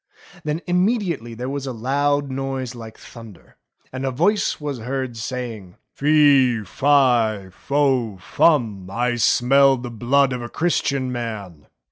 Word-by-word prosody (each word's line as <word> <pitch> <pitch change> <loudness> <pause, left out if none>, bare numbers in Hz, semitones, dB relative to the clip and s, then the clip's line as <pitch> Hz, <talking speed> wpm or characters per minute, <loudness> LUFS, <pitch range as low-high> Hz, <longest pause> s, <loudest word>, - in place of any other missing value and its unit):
Then 150 +2 -2
immediately 180 - 0
there 125 +3 -5
was 140 0 -4
a - - -3
loud 140 +4 0
noise 135 -1 -4
like 115 -2 -10
thunder, 115 -6 -14 0.4
and 130 0 -5
a 135 - 0
voice 175 +11 +1
was 145 -4 -4
heard 130 +1 -4
saying: 115 -5 -6 0.2
"Fee, 140 -6 +4
fo, 120 -5 +2
fi, 130 -5 0
fum, 105 - +1
I 120 +4 -1
smell 135 +3 +4
the 120 0 -7
blood 130 +4 +2
of 125 - -4
a 120 - -6
Christian 140 -6 -1
Man. 105 -10 -6
130 Hz, 135 wpm, -21 LUFS, 115-140 Hz, 0.4 s, Fee